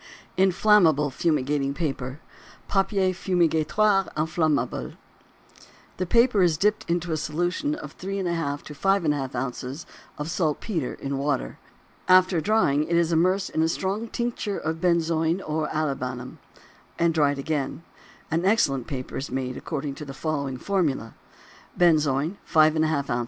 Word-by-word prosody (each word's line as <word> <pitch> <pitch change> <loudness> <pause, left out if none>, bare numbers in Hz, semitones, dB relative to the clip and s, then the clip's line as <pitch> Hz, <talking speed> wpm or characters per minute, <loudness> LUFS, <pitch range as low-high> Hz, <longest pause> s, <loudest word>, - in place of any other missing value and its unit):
INFLAMMABLE 185 -6 +4
FUMIGATING 140 -1 0
PAPER. 135 -4 -3 0.5
Papier 195 -1 +1
Fumigatoire 185 +3 +2
Inflammable. 155 -5 0 1.0
The 185 - -2
paper 235 0 +4
is 170 -4 +3
dipped 210 +3 0
into 170 0 -1
a 160 - 0
solution 175 - -1
of - - -9
3½ 170 -7 -2
to 150 - -9
5½ 150 -6 0
ounces 130 +3 -4 0.3
of 150 - -4
saltpetre 160 - -1
in 135 0 -4
water; 140 -2 -2 0.5
after 185 -2 +5
drying 155 -8 +2
it 170 - -1
is 170 0 +2
immersed 185 +4 +2
in 160 - 0
a 160 - +3
strong 195 +7 -2
tincture 235 -4 -3
of 160 +1 -3
benzoin 170 -1 +1
or 155 -3 -2
olibanum 130 -5 -3 0.6
and 170 -1 +2
again 145 -3 +2
dried. 150 -1 -2 0.6
An - - -4
excellent 150 - +2
paper 130 -3 -5
is 135 - -4
made 130 0 -3
according 145 -3 -4
to 150 - -8
the 135 -2 -8
following 140 -4 -2
formula: 150 - -1 0.6
Benzoin 155 0 +2
5½ 155 -2 +3
oz. 120 - +1
160 Hz, 130 wpm, -25 LUFS, 140-185 Hz, 1.0 s, after